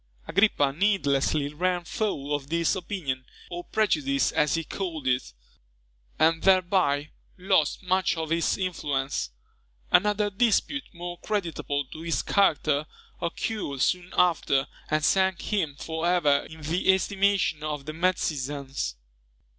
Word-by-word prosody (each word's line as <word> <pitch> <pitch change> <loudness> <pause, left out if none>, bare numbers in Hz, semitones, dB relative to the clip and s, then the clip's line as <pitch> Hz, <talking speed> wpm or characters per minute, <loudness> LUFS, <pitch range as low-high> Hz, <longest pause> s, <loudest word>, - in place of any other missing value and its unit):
Agrippa 170 -8 +3
needlessly 145 -5 +1
ran 180 +2 0
foul 155 -7 -2
of 140 -1 -3
this 170 0 +1
opinion, 170 -9 -3 0.3
or 175 0 -5
prejudice 145 -10 +1
as 150 +2 +2
he 165 - -1
called 165 -4 -5
it, 130 0 0 0.9
and 160 +1 +3
thereby 180 -6 +3 0.3
lost 185 -3 +1
much 185 -1 +1
of 160 -1 -3
his 165 0 +1
influence. 145 - -2 0.6
Another 210 +1 +3
dispute, 240 +7 +1
more 175 -1 -7
creditable 165 -8 -2
to 155 +5 -10
his 165 0 -1
character, 155 -6 +2 0.3
occurred 170 - -3
soon 180 0 0
after, 155 -6 +3 0.2
and 155 0 +1
sank 190 0 +3
him 165 -10 -1
for 160 +2 -3
ever 150 -6 +3
in 160 0 -11
the 170 +5 +3
estimation 190 -4 +1
of 150 -2 -4
the 155 - -5
Metzians. 140 - -1
165 Hz, 125 wpm, -26 LUFS, 145-190 Hz, 0.9 s, Agrippa